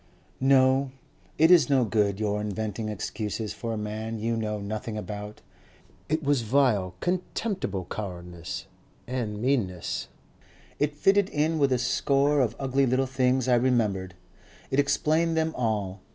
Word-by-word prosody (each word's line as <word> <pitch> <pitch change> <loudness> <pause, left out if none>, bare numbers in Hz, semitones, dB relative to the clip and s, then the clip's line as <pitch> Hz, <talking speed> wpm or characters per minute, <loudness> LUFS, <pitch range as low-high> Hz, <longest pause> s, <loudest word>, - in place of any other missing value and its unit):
"No. 135 0 +4 0.5
It 160 +3 +5
is 160 -8 +6
no 135 -3 +4
good 105 -2 +1
your 105 -1 0
inventing 110 +1 -3
excuses 105 +1 -4
for 115 - -5
a 110 - -2
man 110 +2 -4
you 115 +2 -1
know 110 -1 -2
nothing 105 +2 -4
about. 105 0 -6 0.7
It 155 +1 0
was 140 -3 +2
vile, 110 -7 +2
contemptible 180 - -2
cowardice 90 -4 -6 0.4
and 115 -5 -3
meanness. 110 -8 -1 0.7
It 145 0 0
fitted 195 +5 +3
in 155 +2 0
with 140 -2 +3
a 130 - +3
score 140 +3 +2
of 115 -3 0
ugly 135 0 +1
little 130 +2 +2
things 130 -1 +1
I 125 - +4
remembered. 110 -7 +1 0.6
It 135 - +2
explained 160 +3 +2
them 160 0 +1
all. 105 -5 -2
120 Hz, 140 wpm, -27 LUFS, 105-140 Hz, 0.7 s, is